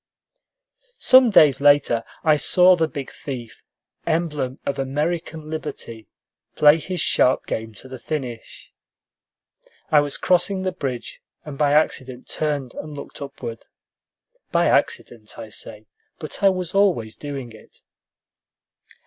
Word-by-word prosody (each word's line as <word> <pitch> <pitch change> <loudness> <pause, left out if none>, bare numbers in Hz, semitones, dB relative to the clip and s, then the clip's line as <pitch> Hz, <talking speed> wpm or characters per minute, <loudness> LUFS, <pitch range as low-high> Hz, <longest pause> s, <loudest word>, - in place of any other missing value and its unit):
Some 255 -1 +6
days 150 - +5
later, 145 -5 +4 0.2
I 155 -2 +5
saw 180 +4 +5
the 165 -2 +1
big 140 -4 -7
thief 125 -5 -8 0.5
emblem 150 -6 -1
of 140 0 -2
American 155 +3 -3
liberty 145 -8 -6 0.5
play 150 +2 +6
his 180 +2 -4
sharp 130 -3 +2
game 110 -1 -5
to 115 - -9
the 130 -1 -9
finish. 125 -5 -6 1.2
I 150 - +7
was 145 -1 -1
crossing 185 +1 +1
the 185 - -1
bridge, 135 -9 -5 0.2
and 150 -2 -7
by 145 0 +2
accident 130 -4 0
turned 145 -5 -3
and 150 -1 -8
looked 145 - -10
upward. 120 -5 -8 0.8
(By - - +2
accident, 110 -3 -1
I 110 - -8
say, 105 0 -7 0.3
but 155 - -6
I 200 - +6
was 185 -3 -3
always 180 - +2
doing 140 -5 -7
it.) 110 - -17
145 Hz, 130 wpm, -22 LUFS, 125-160 Hz, 1.2 s, I